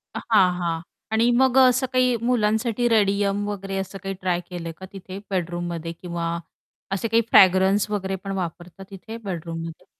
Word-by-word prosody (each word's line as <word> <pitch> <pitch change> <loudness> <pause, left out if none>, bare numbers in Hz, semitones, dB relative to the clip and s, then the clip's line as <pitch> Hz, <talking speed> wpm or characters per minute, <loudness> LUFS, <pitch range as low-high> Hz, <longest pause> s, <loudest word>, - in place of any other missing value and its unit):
हां, 200 -5 +3
हां. 165 -2 -1 0.3
आणि 225 +2 +3
मग 260 +1 +3
अ, - - +9
असं 260 +1 +1
काही 255 -1 +3
मुलांसाठी 235 0 +1
रेडियम 205 -1 +2
वगैरे 195 -1 -4
असं 195 +1 -4
काही 195 0 -3
ट्राय 180 -2 0
केलंय 170 -2 -5
का 190 - -9
तिथे 190 0 -8
बेडरूममध्ये 175 -2 -3
किंवा 170 -2 -3 0.6
असे 195 +4 -1
काही 230 +1 +3
फ्रॅग्रन्स 190 +2 +5
वगैरे 195 -2 -2
पण 195 - -4
वापरतात 180 +2 -6
तिथे 220 +4 -8
बेडरूममध्ये? 165 -3 -6
195 Hz, 155 wpm, -23 LUFS, 175-220 Hz, 0.6 s, अ